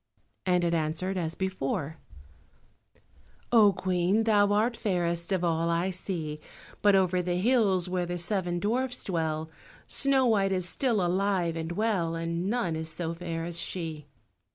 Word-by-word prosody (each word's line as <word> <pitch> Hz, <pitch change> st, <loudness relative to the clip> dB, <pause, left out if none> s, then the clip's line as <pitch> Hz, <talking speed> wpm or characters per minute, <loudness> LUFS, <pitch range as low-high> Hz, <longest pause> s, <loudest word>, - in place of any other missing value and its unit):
and 180 Hz, -1 st, +3 dB
it 170 Hz, 0 st, +1 dB
answered 165 Hz, +4 st, -1 dB
as 165 Hz, -3 st, -2 dB
before— 160 Hz, -4 st, -3 dB, 1.5 s
"Oh, 220 Hz, -4 st, +7 dB
Queen, 185 Hz, +3 st, +1 dB
thou 205 Hz, -2 st, +3 dB
art 220 Hz, +4 st, +2 dB
fairest 175 Hz, -5 st, -1 dB
of 185 Hz, -2 st, +1 dB
all 165 Hz, -1 st, +1 dB
I 170 Hz, +3 st, +1 dB
see, 165 Hz, -5 st, -4 dB, 0.4 s
But 205 Hz, -1 st, +5 dB
over 185 Hz, -1 st, +2 dB
the 175 Hz, 0 st, -1 dB
hills, 195 Hz, -3 st, +2 dB
where 180 Hz, -1 st, -1 dB
the 175 Hz, 0 st, -3 dB
seven 175 Hz, 0 st, -1 dB
dwarfs 245 Hz, +5 st, -1 dB
dwell, 160 Hz, -3 st, -2 dB, 0.3 s
Snow 275 Hz, -2 st, +2 dB
white 200 Hz, -5 st, +3 dB
is 185 Hz, -2 st, 0 dB
still 225 Hz, -3 st, +1 dB
alive 180 Hz, -2 st, +1 dB
and 165 Hz, +1 st, -4 dB
well, 185 Hz, -5 st, 0 dB
And 170 Hz, +2 st, -2 dB
none 220 Hz, -8 st, 0 dB
is 160 Hz, 0 st, -4 dB
so 165 Hz, +1 st, -4 dB
fair 165 Hz, -1 st, -4 dB
as 170 Hz, 0 st, -4 dB
she." 160 Hz, -5 st, -4 dB
180 Hz, 155 wpm, -28 LUFS, 165-200 Hz, 1.5 s, Oh